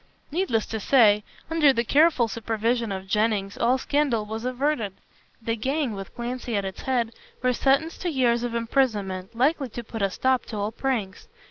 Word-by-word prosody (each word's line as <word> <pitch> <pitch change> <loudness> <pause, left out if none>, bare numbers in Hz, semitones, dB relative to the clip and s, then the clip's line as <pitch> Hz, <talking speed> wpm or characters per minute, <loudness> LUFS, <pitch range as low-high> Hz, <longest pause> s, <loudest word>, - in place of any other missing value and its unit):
Needless 295 - 0
to 220 - -4
say, 210 -3 +5 0.3
under 310 -4 +5
the 235 -3 0
careful 290 -1 +4
supervision 230 0 -1
of 190 -1 -4
Jennings, 205 -1 0
all 245 +2 +2
scandal 265 -5 0
was 220 +2 -5
averted. 255 -5 -1 0.5
The 230 -1 -2
gang 270 +3 -1
with 195 -1 -8
Clancy 245 -1 -4
at 200 - -1
its 190 - -6
head 240 -3 0 0.3
were 250 0 +3
sentenced 275 +7 +1
to 360 - -1
years 245 -5 +2
of 240 -1 -3
imprisonment, 220 -6 -1
likely 275 +1 +2
to 240 +2 -6
put 225 -1 -6
a 195 - +2
stop 260 +6 0
to 220 - -5
all 205 +1 -1
pranks. 225 -6 -3
235 Hz, 175 wpm, -25 LUFS, 215-265 Hz, 0.5 s, say